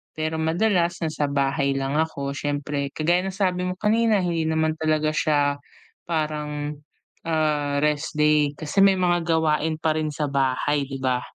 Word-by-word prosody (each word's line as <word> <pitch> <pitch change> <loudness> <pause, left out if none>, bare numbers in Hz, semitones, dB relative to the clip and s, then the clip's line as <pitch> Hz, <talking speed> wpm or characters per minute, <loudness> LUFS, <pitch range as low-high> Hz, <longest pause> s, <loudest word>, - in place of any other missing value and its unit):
pero 155 0 -2
madalas 175 +2 +1
nasa 155 -2 -1
bahay 140 0 0
lang 135 +2 -1
ako 140 -3 -2
siyempre 145 0 -2
kagaya 175 +4 +1
ng 190 - -5
sabi 180 -2 0
mo 180 - -3
kanina 215 0 +2
hindi 165 -2 -1
naman 160 0 0
talaga 155 -1 +1
siya 145 -2 +1 0.5
parang, 150 -2 -2 0.5
ah, 150 -3 0
rest 150 0 0
day 150 -1 +3
kasi 155 +5 -2
may 195 -1 +6
mga 175 -1 +2
gawain 160 -1 +1
pa 155 -1 +1
rin 155 -1 -1
sa 150 0 -2
bahay 140 +2 +1
'di 135 -1 -6
ba? 125 -1 0
155 Hz, 160 wpm, -24 LUFS, 145-165 Hz, 0.5 s, may